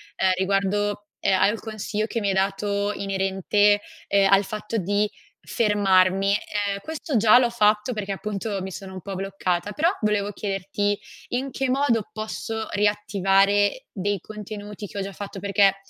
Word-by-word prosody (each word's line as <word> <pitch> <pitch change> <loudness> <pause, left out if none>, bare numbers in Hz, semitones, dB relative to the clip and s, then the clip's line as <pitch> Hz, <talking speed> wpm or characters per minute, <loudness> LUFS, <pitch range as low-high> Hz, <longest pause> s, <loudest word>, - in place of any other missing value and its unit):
ehm, 190 - +2
riguardo, 200 +2 0
ehm, 190 -1 +2
al 210 +3 +3
consiglio 215 -1 -3
che 230 - -2
mi 205 - -1
hai - - +2
dato 200 +1 0
inerente, 195 +1 +2 0.3
ehm, 195 -1 +3
al 195 +1 +6
fatto 215 +2 -4
di 205 +2 +1 0.4
fermarmi. 195 -3 +3
Ehm, 205 -1 -1
questo 315 0 -4
già 220 +2 +7
l'ho 245 -2 +2
fatto, 210 +1 +2
perché 205 -3 -4
appunto 205 +1 -3
mi 190 - -5
sono 190 +1 -8
un 185 - -7
po' 195 +2 -6
bloccata, 190 0 -2
però 315 +8 +2
volevo 210 -1 +1
chiederti: 200 +1 -1 0.3
in 265 +2 -2
che 265 +1 -1
modo 250 -5 +1
posso 220 0 -4
riattivare 205 +1 +2
dei 200 0 -1
contenuti 210 +1 -8
che - - -10
ho - - -1
già 195 0 -5
fatto? 200 0 -7
Perché, 200 0 +3
205 Hz, 160 wpm, -24 LUFS, 195-215 Hz, 0.4 s, già